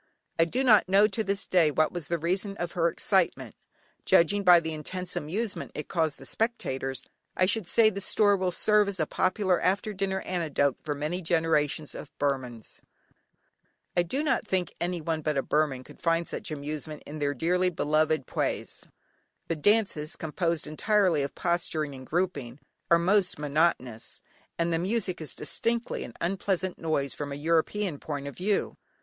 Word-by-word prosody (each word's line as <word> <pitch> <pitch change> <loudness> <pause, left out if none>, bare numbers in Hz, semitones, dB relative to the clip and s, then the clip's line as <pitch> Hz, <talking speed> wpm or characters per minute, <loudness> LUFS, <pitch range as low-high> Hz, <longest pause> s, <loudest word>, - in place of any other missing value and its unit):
I 165 - +6
do 250 +10 -1
not 215 -7 +5
know 200 +2 +6
to 220 0 -1
this 200 -1 -1
day 175 -4 +4
what 155 +1 +1
was 175 -5 -6
the 170 - 0
reason 185 +5 -1
of 175 0 -3
her 170 -3 +1
excitement. 170 - +1 0.5
Judging 200 +5 +4
by 180 -2 +8
the 160 -1 -4
intense 180 +4 -4
amusement 200 +8 -3
it 150 - -6
caused 160 -5 0
the 135 - -12
spectators, 135 - -2 0.3
I 185 - +4
should 205 -1 +1
say 220 +2 +5
the 200 0 -5
story 205 +1 +3
will 185 -1 0
serve 210 +3 +3
as 195 -2 -3
a 155 - +2
popular 185 +2 +1
after 200 +3 0
dinner 190 0 -2
anecdote 155 -6 0
for 145 -1 -2
many 155 +6 -3
generations 160 -3 +1
of - - -8
Burmans. 130 -5 -3 1.1
I 175 - +4
do 260 - -1
not 305 - +1
think 185 -2 -1
anyone 165 -2 -2
but 150 -1 -1
a 135 - +1
Burman 150 -4 0
could - - -15
find 165 0 +1
much - - -2
amusement 150 0 -5
in 155 +1 -7
their 145 -1 0
dearly 180 +6 +1
beloved 155 -3 +1
Pwés. - - -3 0.6
The 165 - +1
dances, 165 -3 +2
composed 165 +1 -1
entirely 180 +1 +2
of 140 - -4
posturing 165 -4 0
and 130 -1 -10
grouping, 150 -8 -2 0.3
are 170 - +6
most 185 +2 +2
monotonous, 145 -6 0 0.4
and 170 0 0
the 165 - +1
music 185 -1 -1
is 155 - -5
distinctly 230 0 -1
an 120 - -9
unpleasant 185 0 -1
noise 150 -4 0
from 145 -1 -5
a - - -3
European 165 +3 0
point 145 -2 -5
of 140 - -6
view. 200 +3 -1
170 Hz, 170 wpm, -28 LUFS, 150-190 Hz, 1.1 s, by